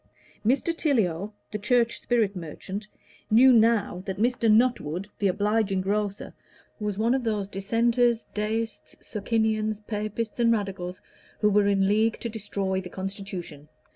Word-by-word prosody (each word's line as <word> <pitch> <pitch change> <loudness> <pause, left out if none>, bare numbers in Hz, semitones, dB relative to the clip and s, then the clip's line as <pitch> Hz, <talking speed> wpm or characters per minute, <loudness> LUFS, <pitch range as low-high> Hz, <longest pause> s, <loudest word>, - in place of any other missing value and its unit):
Mr. 270 +9 +1
Tiliot, 210 - 0 0.2
the 210 - -3
Church 235 +2 +2
spirit 220 -5 +1
merchant, 190 +5 -6 0.4
knew 250 +4 +7
now 225 -5 +3
that 190 -1 -3
Mr. 230 0 +2
Nuttwood, 215 -7 +2
the 200 - +2
obliging 205 0 +1
grocer, 200 +1 -2 0.5
was 210 -2 -2
one 230 +3 +2
of 265 -1 0
those 210 -4 -1
Dissenters, 230 +4 +1
Deists, 220 +1 -3
Socinians, 215 0 -1
Papists, 215 +2 -4
and 235 -1 +4
Radicals, 190 -4 -3 0.4
who 210 -1 +4
were 205 0 +4
in 195 -1 +3
league 220 +3 +2
to 235 - -3
destroy 200 -3 -2
the 180 - -9
Constitution. 190 -6 -6
210 Hz, 140 wpm, -26 LUFS, 195-230 Hz, 0.5 s, knew